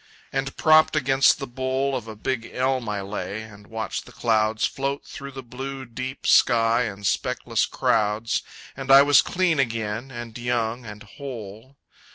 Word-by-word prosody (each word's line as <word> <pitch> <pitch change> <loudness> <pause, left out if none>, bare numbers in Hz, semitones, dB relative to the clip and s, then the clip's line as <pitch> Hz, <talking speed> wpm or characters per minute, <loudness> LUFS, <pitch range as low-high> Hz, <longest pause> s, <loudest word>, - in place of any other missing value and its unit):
and 135 0 -2
propped 155 0 +5
against 135 -2 +4
the 140 - -5
bole 130 +2 -1
Of 120 -3 -5
a 110 - -7
big 115 +2 -3
elm 130 -2 0
I 105 -1 -2
lay, 100 +1 -5
and 105 -2 -14
watched 110 -1 -4
the - - -12
clouds 110 -2 +1
Float 140 +1 -3
through 140 -2 -8
the 135 0 -7
blue, 130 +2 -6
deep 130 +3 -6
sky 115 0 +4
in 100 -2 -7
speckless 100 - 0
crowds, 110 +1 +1 0.3
And 135 0 -7
I 135 +1 +9
was 145 0 +6
clean 180 -4 +1
again, 115 -1 -1
and 120 -3 -8
young, 120 -1 -2
and 105 +1 -9
whole. 115 0 -9
120 Hz, 165 wpm, -24 LUFS, 110-135 Hz, 0.3 s, I